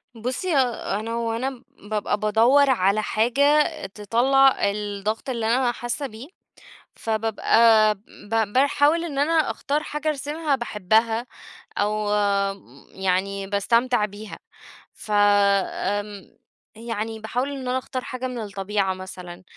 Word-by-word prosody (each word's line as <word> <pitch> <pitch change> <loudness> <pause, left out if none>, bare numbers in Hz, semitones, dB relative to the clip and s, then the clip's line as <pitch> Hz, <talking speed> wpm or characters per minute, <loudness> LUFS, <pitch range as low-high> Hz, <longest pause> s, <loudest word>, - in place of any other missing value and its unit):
بُصي 255 +9 -2
أنا 230 -3 -1
وأنا 235 +3 -3
بابقى 205 0 -2
بادوّر 230 +7 +4
على 210 -4 +2
حاجة 280 +8 +3 0.2
تطلع 240 +7 +3 0.2
الضغط 210 +3 -4
اللي 235 -3 -2
أنا 245 +2 +2
حاسة 240 +4 -4
بيه، 225 +3 -11 0.7
فبابقى 220 0 +3 0.3
ب 215 - -5 0.2
باحاول 285 +5 +3
إن 290 -5 -5
أنا 295 +3 +2 0.2
أختار 295 +2 -2
حاجة 300 0 -4
أرسمها 300 +1 -1
باحبها، 225 +1 0 0.5
أو 210 0 0 0.8
يعني 190 +1 -1
باستمتع 230 +4 +1
بيها، 210 +1 -8 0.5
ف - - -12
آمم 205 0 +1 0.4
يعني 225 -1 -5
باحاول 245 +5 -2
إن 265 -3 -5
أنا 255 - +1
أختار 260 0 -5
حاجة 255 0 -5
من 250 -1 -6
الطبيعة 195 -1 -2
مثلًا، 185 -1 -9
225 Hz, 115 wpm, -23 LUFS, 205-260 Hz, 0.8 s, بادوّر